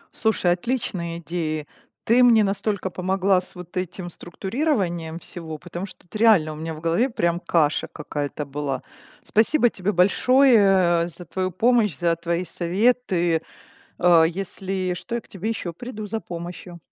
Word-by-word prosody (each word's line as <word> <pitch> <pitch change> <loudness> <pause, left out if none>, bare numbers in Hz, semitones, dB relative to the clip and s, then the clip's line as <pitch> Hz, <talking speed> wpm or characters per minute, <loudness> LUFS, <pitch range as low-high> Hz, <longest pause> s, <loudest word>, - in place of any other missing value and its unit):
Слушай, 220 -9 +1
отличные 180 -5 -3
идеи. 160 -3 -3 0.4
Ты 240 +3 +4
мне 230 -3 +6
настолько 200 -1 -1
помогла 190 +1 +1
с - - -14
вот 180 0 -11
этим 180 0 -4
структурированием 180 - -2
всего, 160 -3 -7
потому 175 +3 -6
что - - -14
тут 175 - -18
реально 210 -8 +4
у - - -8
меня 160 +1 -5
в 155 - -10
голове 170 +11 +1
прям 170 -6 0
каша 155 -4 +1
какая-то 145 0 -5
была. 140 -2 -4 0.4
Спасибо 240 +4 +3
тебе 195 -1 -2
большое, 250 +8 +5 0.5
э, - - -5
за 175 +1 -9
твою 185 +3 -2
помощь, 220 - +2
за 170 -1 +1
твои 170 +1 -2
советы! 180 -2 +1 0.6
О, 170 -2 +6
если 185 +1 -2
что, 230 +6 -6
я 235 - -1
к - - -25
тебе 200 +3 -5
ещё 185 -6 -3
приду 215 +2 -7
за 220 +2 -3
помощью. 175 0 -8
180 Hz, 155 wpm, -23 LUFS, 170-215 Hz, 0.6 s, мне